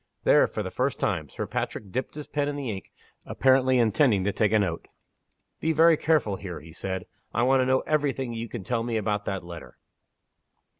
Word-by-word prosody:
There, - - +5
for - - -4
the - - -5
first - - -1
time, - - -1
Sir - - -4
Patrick 100 -3 -4
dipped 130 +6 -3
his 150 -1 -6
pen 145 -1 -1
in 145 - -2
the 135 -5 -3
ink, 95 -2 -8 0.3
apparently 130 -1 +3
intending 115 -2 +3
to 100 - +1
take 105 0 +1
a 110 - +4
note. 85 -6 -1 0.7
"Be 160 +1 +1
very 165 +1 +6
careful 150 -11 +1
here," 95 -4 -7
he 80 +1 -13
said; 95 +1 -4 0.3
"I 120 - +2
want 130 +1 +4
to 130 - +1
know 130 0 +3
every 150 -2 +1
thing 130 -2 -4
that 115 - -5
you 115 0 -5
can 115 -5 -6
tell 115 +3 -1
me 115 -1 -1
about 105 -1 -1
that 95 -2 -3
letter." 85 -3 -10
115 Hz, 215 wpm, -26 LUFS, 100-135 Hz, 0.7 s, very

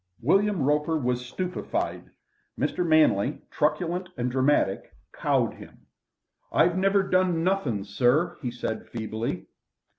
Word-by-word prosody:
William 195 - +2
Roper 150 +3 +1
was 125 -3 -1
stupefied. 180 +7 -3 0.5
Mr. 180 - 0
Manley, 155 - +3
truculent 175 +4 0
and 125 0 -1
dramatic, 130 -6 +1 0.2
cowed - - +1
him. - - -15 0.7
"I - - +4
never 195 +2 +2
done 185 -3 +1
nothing, 160 - 0
sir," 125 - +1
he 125 - -2
said 120 -2 -5
feebly. 110 0 -4
150 Hz, 115 wpm, -26 LUFS, 120-180 Hz, 0.7 s, I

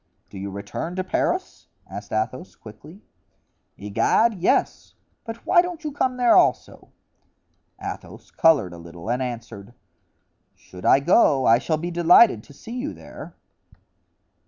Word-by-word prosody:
"Do 95 - -9
you 100 +1 -5
return 100 - -6
to 185 - -2
Paris?" 185 - -2 0.2
asked 100 +2 -9
Athos, 110 +10 -3
quickly. 145 - -14 0.7
"Egad! 105 - +1
yes; 185 -2 -1 0.3
but 225 0 -8
why 350 -2 +5
don't 350 -2 -7
you 305 - -4
come 260 -2 -1
there 245 -1 +4
also?" 365 0 +1 0.9
Athos - - -9
colored 140 - +3
a 85 - -10
little 85 +5 -8
and 125 +2 -1
answered: 115 -3 -7 0.8
"Should 90 0 -13
I 135 - +5
go, 140 - +3
I 115 +1 +5
shall 155 +4 -1
be 170 +3 -5
delighted 175 - +5
to - - -17
see 230 - -8
you 290 +5 -5
there." - - -12
150 Hz, 140 wpm, -23 LUFS, -, 0.9 s, why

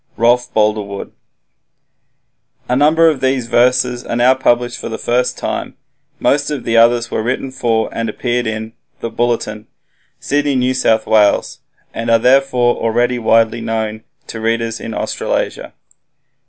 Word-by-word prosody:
Rolf 120 +1 +2
Boldrewood 105 -2 -1 1.6
A 125 - 0
number 155 +4 +4
of 150 -5 +1
these 130 -2 0
verses 125 +1 +2
are - - -4
now 125 +2 +4
published 120 -2 0
for - - -6
the 110 - -4
first 125 +1 0
time, - - -4 0.4
most 145 +1 +1
of 145 -4 -4
the 115 - -1
others 120 +1 +3
were - - -1
written 130 +3 -3
for 115 -3 0
and 115 -1 -2
appeared 120 +2 -2
in 110 0 -4 0.3
"The 115 - -4
Bulletin" 115 -3 -2 0.5
(Sydney, 145 0 0
N.S.W.), 110 -5 +2 0.5
and 115 +1 -4
are 115 - +5
therefore 125 0 +2
already 120 +2 0
widely 115 0 +2
known 110 -1 -3 0.2
to 115 - -7
readers 115 0 -1
in 115 - -6
Australasia. - - -3
120 Hz, 140 wpm, -16 LUFS, 115-125 Hz, 1.6 s, are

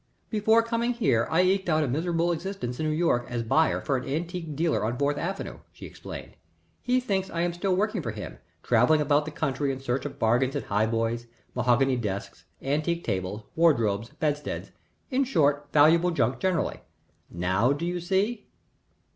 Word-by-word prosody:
"Before 220 +1 +4
coming 230 +1 0
here 130 - +1
I 170 +3 +3
eked 190 0 +1
out 155 -1 +3
a - - 0
miserable 165 +5 0
existence 170 -8 -4
in 155 - 0
New - - +1
York 155 -7 +1
as 120 -2 -2
buyer 155 +8 +2
for 135 -3 0
an 130 +1 -6
antique 165 +1 -3
dealer 160 -3 +1
on 115 +3 -1
Fourth 145 +1 0
Avenue," 190 +5 -4
she - - -11
explained. - - -9 0.5
"He 250 0 +2
thinks 195 -6 -1
I 170 - -2
am 175 0 0
still 185 +2 0
working 210 0 0
for 120 - -4
him, 105 -1 -7 0.2
travelling 125 +6 +4
about 145 0 +2
the - - -4
country 145 -2 -1
in 135 - -5
search 135 0 -2
of - - -10
bargains 125 +5 +2
in 145 - -2
high 105 +2 +1
boys, 115 +1 -1 0.3
mahogany 125 +2 +2
desks, 100 -4 -5 0.2
antique 155 +5 0
tables, 95 +1 -3
wardrobes, 115 -10 +2
bedsteads 150 -1 -3 0.4
in 265 +1 +2
short, 145 - +1
valuable 160 +4 +5
junk 135 -6 0
generally. 185 -4 0 0.5
Now 95 +8 +1
do 145 +4 -1
you 175 0 -2
see?" 195 +6 -1
150 Hz, 180 wpm, -27 LUFS, 125-175 Hz, 0.5 s, valuable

